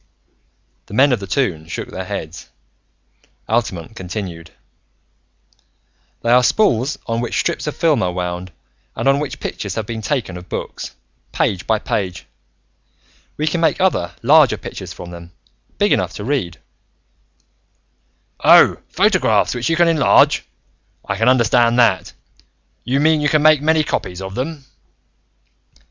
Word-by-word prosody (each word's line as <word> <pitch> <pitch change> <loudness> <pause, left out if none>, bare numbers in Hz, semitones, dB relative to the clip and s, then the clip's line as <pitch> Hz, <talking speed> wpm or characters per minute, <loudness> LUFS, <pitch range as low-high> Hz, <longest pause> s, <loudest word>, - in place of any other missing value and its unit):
The 105 - -8
men 140 +4 +5
of 120 - 0
the 100 - -7
Toon 90 - -1
shook - - -6
their - - -5
heads. - - -7 1.0
Altamont 110 -4 -2
continued: 90 -4 -6 1.7
"They 115 - +1
are 125 +1 +6
spools 130 - +2
on 115 0 -2
which 120 - -3
strips 170 -2 -2
of 150 - -3
films 160 -4 +2
are 90 - 0
wound 90 0 -4 0.4
and - - -2
on 135 +1 +4
which 150 -2 -5
pictures 100 -2 -5
have 110 - -3
been 115 0 -5
taken 110 -7 -2
of 90 0 -12
books, - - -6 0.4
page 95 -3 -1
by 110 - +2
page. 95 -4 -3 1.1
We 150 - -1
can 165 +2 -1
make 165 - +2
other, 180 - 0
larger 145 +1 +5
pictures - - -8
from 85 0 -9
them, 85 0 -11 0.4
big - - +2
enough - - -1
to - - -7
be 115 - -5
read 90 - -1 1.4
" 65 0 -45
"Oh, - - +7
photographs, - - +2
which 125 +4 -2
you 165 - +2
can 175 +1 +4
enlarge. 160 -3 +4 0.6
I 95 - -1
can 115 +4 +2
understand 120 -1 +3
that. 115 -6 +2 0.7
You 130 +3 0
mean, 155 +1 +3
you 145 - +2
can 150 0 +2
make 155 -2 +5
many 160 +1 +2
copies 90 -10 -3
of 95 0 -7
them?" 140 +4 -5
115 Hz, 150 wpm, -19 LUFS, 95-145 Hz, 1.7 s, Oh